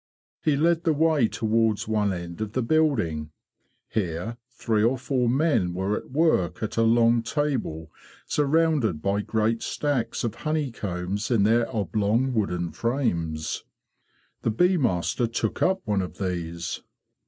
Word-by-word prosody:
He 150 -3 +2
led 165 +2 +2
the 160 - +3
way 155 -5 +3
towards 110 -1 0
one 105 -2 +1
end 85 +1 -6
of 110 -1 -3
the 130 - 0
building. 115 - +1 0.6
Here 95 +3 -3
three 115 -3 0
or 120 +4 +3
four 125 -1 0
men 130 - +2
were 95 +3 0
at - - -6
work 130 - +1
at 110 - -3
a 115 - +2
long 115 +1 +4
table 115 - -2 0.3
surrounded 150 - +1
by 100 +1 +1
great 110 +2 0
stacks 135 -6 -1
of 115 -3 -1
honeycombs 105 - -2
in 115 -5 +3
their 115 +2 +3
oblong 110 +4 0
wooden 90 -6 -1
frames. 85 - -1 0.8
The - - 0
bee 180 - +3
master 120 - +1
took 115 -1 -2
up 190 +1 +2
one 105 -3 +1
of 90 - -6
these. 85 -3 -3
115 Hz, 140 wpm, -25 LUFS, 95-135 Hz, 0.8 s, long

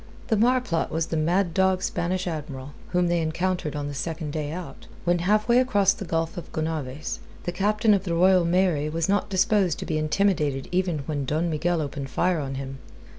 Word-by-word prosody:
The 220 - +3
marplot 240 -6 +2
was 160 +1 -1
the 165 - -4
mad 170 +3 +1
dog 190 0 +2
Spanish 180 +2 -1
Admiral, 145 -5 -5 0.2
whom 180 0 +2
they 170 -1 +1
encountered 165 0 -1
on 145 -1 -3
the 145 - -5
second 160 +1 -4
day 150 -2 -3
out, 175 +1 -8 0.2
when 175 0 +2
halfway 215 +6 +3
across 205 -7 +3
the 195 - -7
Gulf 165 +1 -2
of 175 - -7
Gonaves. 155 -3 -3 0.2
The 175 - -2
Captain 210 +4 +2
of 195 -2 +1
the 170 -3 -1
Royal 185 +1 +5
Mary 170 -4 +2
was 165 +1 -1
not 205 +1 +1
disposed 190 -2 +2
to - - -5
be 155 -1 -1
intimidated 155 -4 +1
even 180 -4 0
when 145 -2 -2
Don 160 +5 0
Miguel 165 +1 0
opened 140 -1 -5
fire 175 +5 +1
on 135 -2 -4
him. 135 0 -6
170 Hz, 195 wpm, -25 LUFS, 155-190 Hz, 0.2 s, Royal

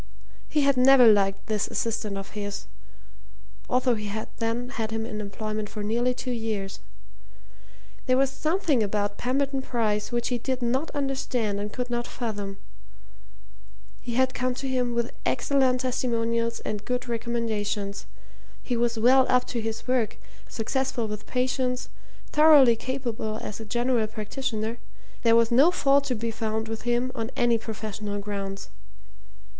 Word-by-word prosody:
He 300 - +2
had 280 -2 +3
never 255 0 +7
liked 200 -3 +4
this 215 -2 0
assistant 215 -3 -2
of 195 0 -7
his, 205 -1 -5 1.0
although 250 0 +3
he 210 -2 -3
had 215 +2 -4
then 230 +2 -1
had 225 -4 -3
him 225 0 -2
in 215 -2 -4
employment 215 +1 -4
for 210 - -5
nearly 240 +4 +1
two 255 - -4
years. 220 -5 -3 1.3
There 255 0 +4
was 270 0 +3
something 310 - +1
about 205 0 -1
Pemberton 270 +2 0
Bryce 220 -5 -1
which 240 0 0
he 245 -1 -1
did 260 +1 -2
not 260 +6 0
understand 260 -7 -1
and 205 +1 -4
could 245 +2 -4
not 240 0 -1
fathom. 205 -4 -4 1.4
He 240 -2 -4
had 260 +1 +3
come 250 0 -1
to 270 +1 -4
him 250 -2 0
with 235 0 0
excellent 260 -3 +2
testimonials 230 -2 0
and 210 -1 -4
good 250 0 -2
recommendations; 220 -3 -2 0.6
he 245 - -1
was 235 0 +1
well 255 +4 +5
up 250 0 +4
to 235 - -2
his 225 +2 -4
work, 250 -4 +1 0.3
successful 245 0 -1
with 210 0 -6
patients, 250 0 -1 0.4
thoroughly 295 -6 +7
capable 235 -4 -3
as 210 - -6
a 225 - -7
general 240 0 +1
practitioner 220 +1 -3 0.4
there 230 -1 +5
was 230 0 +4
no 270 +8 +6
fault 280 -5 +3
to 255 -3 -1
be 230 +1 -2
found 220 0 -2
with 225 +2 -4
him 240 +2 +1
on 225 0 -3
any 240 -1 +3
professional 215 -2 -5
grounds. 200 -1 -5
235 Hz, 150 wpm, -26 LUFS, 215-255 Hz, 1.4 s, never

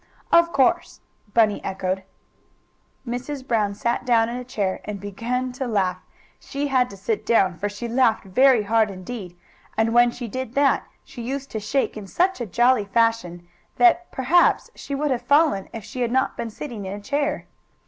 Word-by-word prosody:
"Of 340 0 +5
course," 265 -5 +1 0.4
Bunny 215 -3 +3
echoed. 190 0 -2 1.1
Mrs. 255 +3 -5
Brown 210 -5 +1
sat 235 +4 -1
down 230 -2 +3
in 240 - -4
a 250 - -5
chair 200 -6 -2
and 210 -1 -5
began 235 +6 -3
to 260 +1 -4
laugh. 190 -5 0 0.4
She 285 +1 -4
had 255 -2 +2
to 200 - -11
sit 210 +3 -2
down, 190 -6 +3
for 205 - -1
she 205 +4 -6
laughed 235 -2 +2
very 250 +4 +4
hard 220 +1 +2
indeed, 185 -1 -8 0.4
and 225 +1 +2
when 240 0 +6
she 240 0 -6
did 255 +2 -5
that 280 -1 +3 0.2
she 240 - -10
used 270 +3 -5
to 220 - -3
shake 215 +6 -1
in 210 -2 -8
such 360 - 0
a 235 - -3
jolly 240 +2 +3
fashion 200 -6 0 0.3
that, 355 -1 +4
perhaps, 320 +7 +3
she 280 - -6
would 295 +1 -1
have 250 -2 0
fallen 285 -5 +2
if 225 -2 -7
she 235 +4 -6
had 235 -1 0
not 260 +2 +1
been 230 - -4
sitting 225 -3 -7
in 190 - -4
a 205 - -6
chair. 285 +7 -2
235 Hz, 185 wpm, -23 LUFS, 205-260 Hz, 1.1 s, when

